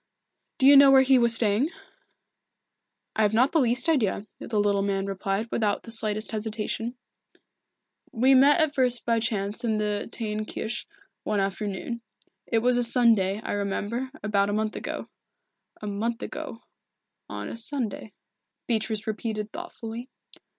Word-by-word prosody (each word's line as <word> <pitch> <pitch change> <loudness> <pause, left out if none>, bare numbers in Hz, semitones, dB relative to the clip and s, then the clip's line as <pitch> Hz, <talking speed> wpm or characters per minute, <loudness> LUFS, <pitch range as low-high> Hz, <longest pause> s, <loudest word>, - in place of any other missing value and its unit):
"Do 260 - +2
you 280 +1 +9
know 275 0 +9
where 265 -1 +7
he 265 -1 +5
was 235 -1 +4
staying?" 225 +6 +2 1.5
"I - - +1
have 210 0 +2
not 255 +5 +4
the 325 - +3
least 245 +1 +1
idea," 220 -10 +1
the 215 -2 -2
little 200 -1 +2
man 195 -1 -1
replied, 195 +2 -2
without 210 -3 0
the 230 - -7
slightest 215 -1 0
hesitation. 220 +2 -3 1.1
"We 255 +4 +4
met 280 +4 +6
at 315 -2 +2
first 250 -3 +1
by 230 -1 +2
chance 210 -2 -2
in 220 -2 +1
the 210 0 -2
Teyn 215 -2 -3
Kirche, 225 - -4 0.3
one 210 -1 -1
afternoon 200 +4 -3 0.5
it 225 -1 +1
was 250 0 +3
a 245 - +2
Sunday, 225 -5 +3
I - - -4
remember, 205 +5 -2
about 200 -1 +1
a - - -1
month 215 0 -1
ago." - - -5 0.7
"A - - -6
month 225 +4 -2
ago 230 - -7 0.7
on - - -5
a - - -6
Sunday," 230 -2 -3 0.5
Beatrice 220 -2 -1
repeated 215 -1 -3
thoughtfully. 245 -8 -7
225 Hz, 150 wpm, -26 LUFS, 210-245 Hz, 1.5 s, you